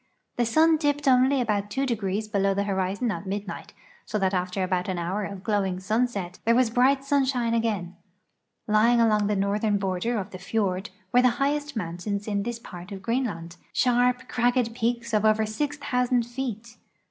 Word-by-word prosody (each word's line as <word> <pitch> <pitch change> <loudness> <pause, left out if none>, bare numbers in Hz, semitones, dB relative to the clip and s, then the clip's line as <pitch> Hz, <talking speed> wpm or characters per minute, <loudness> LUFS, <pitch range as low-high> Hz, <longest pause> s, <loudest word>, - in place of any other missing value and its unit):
The 240 -1 +2
sun 315 +6 +4
dipped 290 -1 0
only 260 +1 +4
about 205 -3 -1
two 270 +6 -1
degrees 215 -3 -2
below 195 -2 +1
the 200 - +1
horizon 200 +4 -1
at 200 - -5
midnight, 200 +1 -5 0.3
so 215 - -3
that 190 -1 +1
after 185 +1 -1
about 185 -1 -1
an 185 - -2
hour 180 +5 -2
of 195 -1 -7
glowing 195 -4 0
sunset 205 -2 -1
there 230 +1 +3
was 245 -2 +3
bright 270 +3 +3
sunshine 265 -4 +1
again, 210 -6 -1 0.7
raying 230 +2 +4
along 215 -3 +3
the 210 - +1
northern 205 +2 +1
border 195 +4 -1
of 200 0 -4
the 185 - -8
fiord 195 -1 -1 0.2
were 250 - +6
the 250 - +5
highest 290 +1 -1
mountains 200 +2 -3
in 205 -1 0
this 235 +2 -3
part 180 -4 -10
of 195 -1 -7
Greenland, 195 -8 -2 0.2
sharp, 250 0 +2
cragged 245 -1 +1
peaks 235 0 -2
of 215 -1 +2
over 215 0 +3
6,000 250 0 0
feet. 240 -2 -6
220 Hz, 175 wpm, -26 LUFS, 195-245 Hz, 0.7 s, were